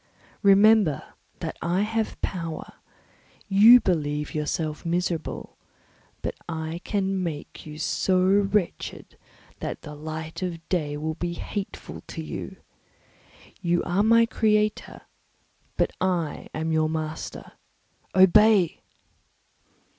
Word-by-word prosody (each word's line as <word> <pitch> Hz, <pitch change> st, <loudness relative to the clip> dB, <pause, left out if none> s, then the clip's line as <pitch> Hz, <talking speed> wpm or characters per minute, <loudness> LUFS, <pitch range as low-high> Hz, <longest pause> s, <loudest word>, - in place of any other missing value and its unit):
Remember 200 Hz, -4 st, +4 dB, 0.3 s
that -, -, -4 dB
I 175 Hz, +3 st, +1 dB
have 220 Hz, +1 st, -1 dB
power; 165 Hz, -4 st, -4 dB, 0.7 s
you 215 Hz, +5 st, +8 dB
believe 150 Hz, -7 st, -1 dB
yourself 155 Hz, 0 st, -2 dB
miserable, 170 Hz, -1 st, -3 dB, 0.7 s
but -, -, -2 dB, 0.2 s
I 160 Hz, +1 st, -4 dB
can 195 Hz, -2 st, -1 dB
make 155 Hz, -3 st, -6 dB
you 150 Hz, 0 st, -8 dB
so 185 Hz, +4 st, +1 dB
wretched 200 Hz, -1 st, 0 dB, 0.4 s
that -, -, -5 dB
the 150 Hz, -, -8 dB
light 155 Hz, +2 st, -6 dB
of 170 Hz, -2 st, -4 dB
day 150 Hz, -5 st, -1 dB
will 155 Hz, +1 st, -2 dB
be 170 Hz, +2 st, -3 dB
hateful 200 Hz, +3 st, -6 dB
to -, -, -6 dB
you. -, -, -6 dB, 1.1 s
You 175 Hz, -1 st, +1 dB
are 180 Hz, +3 st, +1 dB
my 230 Hz, +2 st, +5 dB
creator, 215 Hz, -2 st, 0 dB, 0.8 s
but -, -, +2 dB
I 175 Hz, -5 st, -1 dB
am 160 Hz, +1 st, -2 dB
your 155 Hz, -1 st, +2 dB
master; 155 Hz, 0 st, -5 dB, 0.6 s
obey!" 190 Hz, 0 st, +5 dB
175 Hz, 110 wpm, -25 LUFS, 160-200 Hz, 1.1 s, you